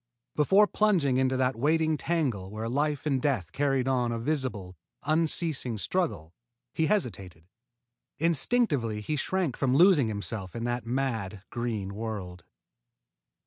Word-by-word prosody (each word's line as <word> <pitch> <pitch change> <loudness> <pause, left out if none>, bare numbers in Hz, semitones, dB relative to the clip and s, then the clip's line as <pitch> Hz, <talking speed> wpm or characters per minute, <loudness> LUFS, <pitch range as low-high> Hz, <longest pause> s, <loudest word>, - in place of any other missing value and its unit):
Before 195 +8 +5
plunging 185 -12 +2
into 130 0 +1
that 130 0 +1
waiting 155 +5 +2
tangle 140 - -1
where 110 +2 -5
life 145 +4 -1
and 135 -4 +1
death 120 - -1
carried 135 -2 0
on 125 -3 +1
a 115 - -2
visible, 115 -8 -2 0.3
unceasing 155 -6 +1
struggle, 100 - -2 0.4
he 160 - +1
hesitated. 100 - -2 0.7
Instinctively 150 - +1
he 150 +8 -2
shrank 175 0 -1
from 130 -2 +1
losing 170 - +6
himself 100 -3 -5
in 115 - -4
that 120 0 -2
mad 115 -6 -2
green 110 -5 -3
world. 100 -5 -6
130 Hz, 130 wpm, -28 LUFS, 110-155 Hz, 0.7 s, losing